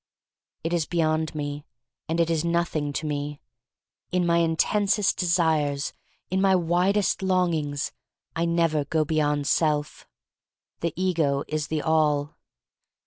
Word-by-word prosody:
It 165 +2 -2
is 165 -3 0
beyond 160 -2 0
me, 145 -1 -4 0.5
and 165 +1 0
it 165 0 +2
is 160 -1 +1
nothing 170 -3 0
to 155 - -3
me. 145 0 -3 0.7
In 180 -1 +1
my 170 0 +3
intensest 195 +5 +2
desires 160 -5 +1 0.2
— - - -40
in 190 +1 +1
my 195 -1 +4
widest 180 +4 +1
longings 170 -7 0 0.2
— - - -51
I 165 +1 0
never 165 -3 +1
go 155 +1 +1
beyond 150 -2 0
self. 150 -1 0 0.7
The 170 - -1
ego 165 -7 +1
is 155 -1 -2
the 155 -1 -2
all. 150 -2 +1
160 Hz, 140 wpm, -25 LUFS, 150-170 Hz, 0.7 s, my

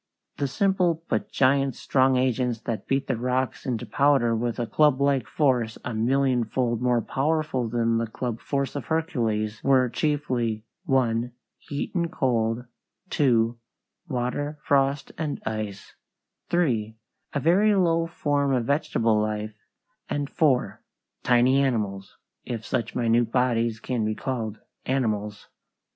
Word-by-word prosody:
The 140 - 0
simple 175 +2 +1
but 110 - -1
giant 135 -1 +2
strong 130 -1 +2
agents 125 -2 0
that 110 -3 -4
beat 135 0 +1
the 130 -4 -1
rocks 125 +3 -1
into 120 -4 -2
powder 135 -5 +3
with 120 +1 -2
a 120 - -1
clublike 140 -3 +2
force 125 -5 +1
a 125 - -2
millionfold 120 0 +1
more 125 -2 +2
powerful 140 -2 0
than 115 0 +1
the 115 - -1
club 115 0 -4
force 140 -1 -2
of 140 - -4
Hercules 115 -10 -1
were 130 -2 +4
chiefly 120 -7 -1 0.2
(1) 120 -4 +1 0.3
heat 145 0 -5
and 170 -3 -1
cold; 120 -6 0 0.5
(2) 120 -5 +2 0.5
water, 145 +2 -2
frost, 140 0 +1
and 155 -3 -2
ice; 110 -2 -5 0.6
(3) 115 -11 0 0.4
a 145 - 0
very 195 +8 +4
low 165 -3 +2
form 145 -4 0
of 120 -2 0
vegetable 115 -6 +1
life; 105 0 -2 0.6
and 145 -1 -2
(4) 145 -7 +1 0.4
tiny 125 +2 +4
animals 105 -7 -2 0.3
if 115 -3 -5
such 115 -3 -2
minute 115 -1 +2
bodies 115 -3 +1
can 120 +1 -2
be 110 0 -1
called 115 -5 -3 0.3
animals. 105 -6 -2
125 Hz, 130 wpm, -25 LUFS, 115-140 Hz, 0.6 s, were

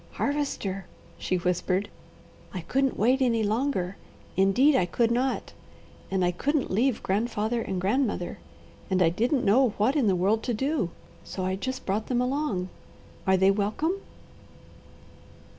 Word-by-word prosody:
"Harvester," 215 -10 -2 0.3
she 185 - -1
whispered, 180 +2 0 0.7
"I 180 - -3
couldn't 270 +8 0
wait 255 +5 +3
any 230 -3 +2
longer; 210 -4 -1 0.4
indeed 240 +10 +4
I 180 - +2
could 230 +5 +1
not: 255 +3 -1 0.6
and 190 -1 +1
I 175 - +2
couldn't 285 - -1
leave 235 +5 +1
grandfather 220 +3 0
and 190 -4 -3
grandmother, 205 -2 0 0.5
and 190 -1 +2
I 165 - +5
didn't 240 - 0
know 230 +1 +4
what 230 +7 +2
in 270 -7 +3
the 190 - +3
world 200 +5 +2
to 245 - 0
do, 270 - 0 0.3
so 185 - -4
I 185 0 0
just 260 +6 -4
brought 210 +3 -1
them 245 -2 +1
along. 250 -8 -1 0.6
Are 190 0 +5
they 190 +1 +5
welcome?" 215 - 0
215 Hz, 145 wpm, -27 LUFS, 190-260 Hz, 0.7 s, I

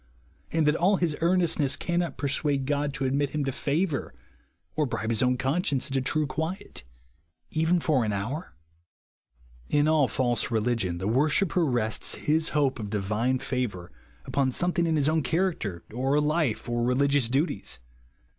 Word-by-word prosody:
and 160 -1 +2
that 150 +1 +3
all 190 +4 +3
bis 170 -4 0
earnestness 165 -5 +2
cannot 175 0 -2
persuade 140 -1 0
God 145 +1 0
to 135 - -2
admit 140 +2 0
liim 150 -2 -1
to 135 - -1
favour, 150 +4 -1 0.6
or 150 -2 +1
bribe 110 -2 -2
his 115 - +1
owti 125 0 +2
conscience 140 0 0
into 135 0 +1
true 150 +4 +1
quiet 160 +7 -4 0.7
even 160 +3 +2
for 150 -6 +2
an 110 - -1
hour? 110 - -4 1.1
In 145 0 +3
all 155 -3 +4
false 120 -2 0
religion, 110 -6 0
the 95 +3 -3
worshipper 155 - +2
rests 120 -7 0
his 155 +1 0
hope 140 -4 +1
of 105 -2 -5
divine 110 +5 0
favour 120 -10 -3 0.3
upon 135 -2 +1
something 175 +3 0
in 160 - +1
his 145 -2 +2
own 160 0 +2
character, 135 - -1
or 135 +4 +1
life, 150 -5 0
or 120 0 -1
religious 130 +1 +2
duties. 135 - -1
140 Hz, 155 wpm, -27 LUFS, 125-160 Hz, 1.1 s, all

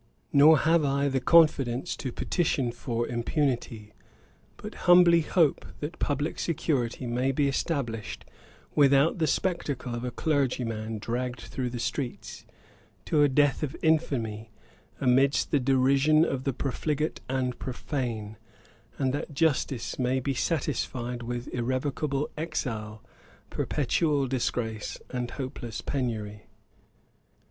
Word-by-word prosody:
Nor 150 +2 +8
have 160 +2 +3
I 140 0 +1
the 135 -1 0
confidence 135 -5 +3
to 130 - -4
petition 135 -5 0
for 120 0 -3
impunity; 120 -4 -2 0.6
but - - -8 0.2
humbly 175 -1 +7
hope, 160 -2 +2 0.2
that 150 +4 -6
publick 145 +2 -1
security 140 -7 -1
may 125 +3 0
be 140 +1 +1
established, 130 - -3 0.5
without 140 +4 +4
the 160 - +2
spectacle 145 -8 -1
of 120 0 -4
a 125 - -2
clergyman 120 -7 -1
dragged 120 +2 -3
through 125 -2 -4
the 120 - -5
streets, 125 +1 -4 0.6
to 150 - +2
a 145 - +5
death 145 +1 +2
of 150 -3 -3
infamy, 120 -9 0 0.5
amidst 135 +2 +3
the 145 - +3
derision 135 +4 +4
of 130 -4 -3
the 135 - 0
profligate 150 +4 -2
and 130 -1 -1
profane; 120 -5 -4 0.6
and 130 -2 0
that 145 0 -4
justice 135 -6 0
may 130 +1 +1
be 135 +2 -1
satisfied 125 -5 -2
with 120 +1 -4
irrevocable 135 +3 -1
exile, 115 -9 -4 0.5
perpetual 145 0 0
disgrace, 120 -4 -2
and 125 -1 -3
hopeless 130 -5 -6
penury. 110 -6 -3
135 Hz, 120 wpm, -27 LUFS, 120-145 Hz, 0.6 s, Nor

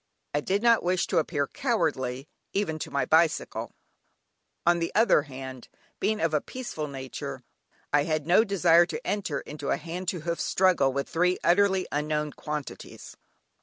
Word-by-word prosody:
I 145 - +1
did 200 +7 -1
not 235 -1 +5
wish 180 0 +1
to - - +1
appear 145 -2 0
cowardly, 145 - -1 0.3
even 160 -6 -1
to - - -5
my 140 -2 0
bicycle; 160 +3 +1 0.9
on 175 0 +4
the 170 - -2
other 225 -7 +5
hand, 130 -3 -9 0.3
being 215 0 0
of 165 -5 0
a 150 - +2
peaceful 240 -12 -5
nature, 135 -2 -6 0.5
I 145 0 +4
had 155 -2 -1
no 180 +6 +5
desire 175 -5 +4
to - - -6
enter 185 -8 -2
into 145 -1 -6
a - - +2
hand 175 +2 -6
to 180 -2 -2
hoof 170 +1 -2
struggle 180 -8 +3
with 140 +1 -2
three 180 +2 +1
utterly 190 +1 +3
unknown 150 0 -1
quantities. 150 -2 -7
165 Hz, 165 wpm, -27 LUFS, 145-185 Hz, 0.9 s, not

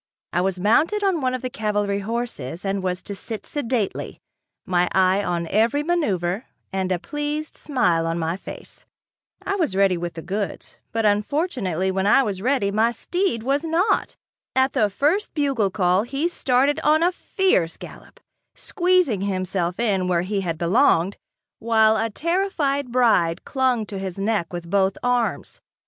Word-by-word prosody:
I 175 - +2
was 185 0 -1
mounted 315 - +2
on 375 -5 +1
one 255 -1 0
of 255 - -6
the 255 - -2
cavalry 205 -2 -1
horses 200 - -4
and 195 0 -1
was 185 0 -2
to 200 - -6
sit 210 +2 -5
sedately, 250 -7 -2 0.5
my 180 -1 +1
eye 190 +1 +3
on 175 -2 -1
every 225 - +1
maneuver 215 - 0 0.3
and 190 -1 -1
a 180 - +2
pleased 295 - -4
smile 175 - +1
on 165 +1 -1
my 165 0 -1
face. 195 - -11 0.6
I 400 - -1
was 320 - 0
ready 195 -2 +3
with 170 -1 -5
the 165 - -7
goods, 200 +2 -4
but 225 -1 0
unfortunately 205 - 0
when 190 +1 0
I 270 +6 +5
was 200 -5 -3
ready, 250 -4 +1
my 220 +3 +3
steed 240 - -1
was 275 +4 0
not. 335 +5 +1 0.4
At 260 +1 +3
the 220 -6 +2
first 310 - 0
bugle 275 -9 +1
call 185 -1 +2
he 275 +8 -1
started 280 -2 +1
on 310 +2 +3
a 355 - +3
fierce 355 - 0
gallop, - - -12 0.4
squeezing 360 - +1
himself 185 -2 -2
in 195 -6 +1
where 175 -1 +1
he 195 +1 -2
had 165 -4 -3
belonged, 180 - +2 0.4
while 220 -1 +4
a 225 +1 0
terrified 295 - -1
bride 205 -9 +2
clung 260 -5 +1
to 200 -2 -6
his 190 -1 -5
neck 200 -3 -1
with 175 -1 -6
both 195 +1 +1
arms. 245 -2 -1
215 Hz, 165 wpm, -23 LUFS, 185-275 Hz, 0.6 s, I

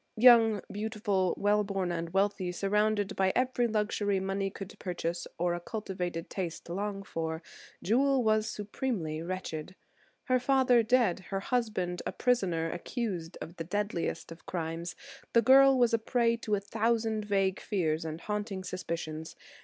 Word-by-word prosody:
Young, 225 -3 +7
beautiful, 205 -3 0
well 205 +1 +3
born, 195 -3 -2
and 165 -1 -3
wealthy, 195 -1 +1
surrounded 205 +2 +1
by 190 -1 +3
every 250 -1 +2
luxury 210 -2 0
money 195 +1 -1
could 195 0 -8
purchase 175 -1 -3
or 175 0 +1
a 175 - -2
cultivated 180 -3 -4
taste 175 -3 -5
long 200 +2 -3
for, 160 -2 -4 0.4
Jewel 265 +4 +3
was 215 0 +2
supremely 205 -7 -3
wretched. 180 -1 -5 0.5
Her 255 0 +2
father 255 -2 +4
dead, 230 -6 +3
her 195 -1 -2
husband 200 -7 -1
a - - -1
prisoner, 180 -10 +1
accused 175 -3 -4
of 170 - -8
the 165 - -3
deadliest 180 -2 -2
of 165 - -12
crimes, 165 0 -4 0.4
the 235 - +6
girl 270 +2 +7
was 240 -2 +3
a 230 - +4
prey 230 0 +2
to 215 -2 0
a - - -1
thousand 220 +1 0
vague 195 -2 +1
fears 165 -6 -1
and 160 +1 -5
haunting 210 -2 -3
suspicions. 165 -3 -5
200 Hz, 150 wpm, -30 LUFS, 175-220 Hz, 0.5 s, Young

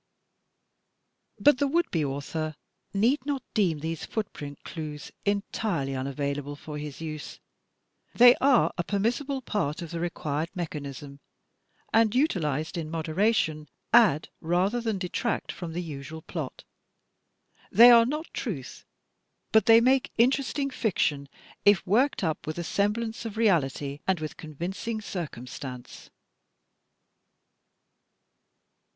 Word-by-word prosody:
But 290 -3 +5
the 285 - +2
would 335 +4 +1
be 165 -3 +1
author 150 +3 -3 0.4
need 235 +8 +2
not 280 -2 -2
deem 175 -9 +1
these 160 0 -4
footprint 150 -10 -5
clues 150 -3 -7
entirely 200 -7 -1
unavailable 140 +2 -3
for 150 +1 -7
his 150 0 -7
use. 155 -2 -6 0.8
They 245 0 +9
are 265 -3 +4
a - - +2
permissible 245 - -1
part 180 -7 -2
of 165 - -8
the 170 - -3
required 160 -2 -2
mechanism, 145 -4 -6 0.7
and 225 0 +4
utilized 165 - 0
in 155 -2 -5
moderation, 160 -1 0 0.2
add 210 -11 +5
rather 185 +8 +1
than 225 -3 -1
detract 190 +5 -2
from 175 -3 -7
the 175 +2 -3
usual 155 0 -8
plot. 155 -7 -6 1.1
They 235 +5 +9
are 230 -1 +7
not 300 +4 -2
truth, 165 - -5 0.7
but 220 +2 +4
they 225 0 +8
make 260 +2 +3
interesting 275 +3 +2
fiction, 150 - 0 0.3
if 205 -1 +5
worked 235 +5 +2
up 160 -3 -2
with 155 - -3
a 175 - -2
semblance 220 +6 -1
of 220 -2 -6
reality 145 - +1
and 190 -3 +2
with 155 -1 -5
convincing 175 +8 -5
circumstance. 130 - -7
175 Hz, 120 wpm, -27 LUFS, 150-230 Hz, 1.1 s, They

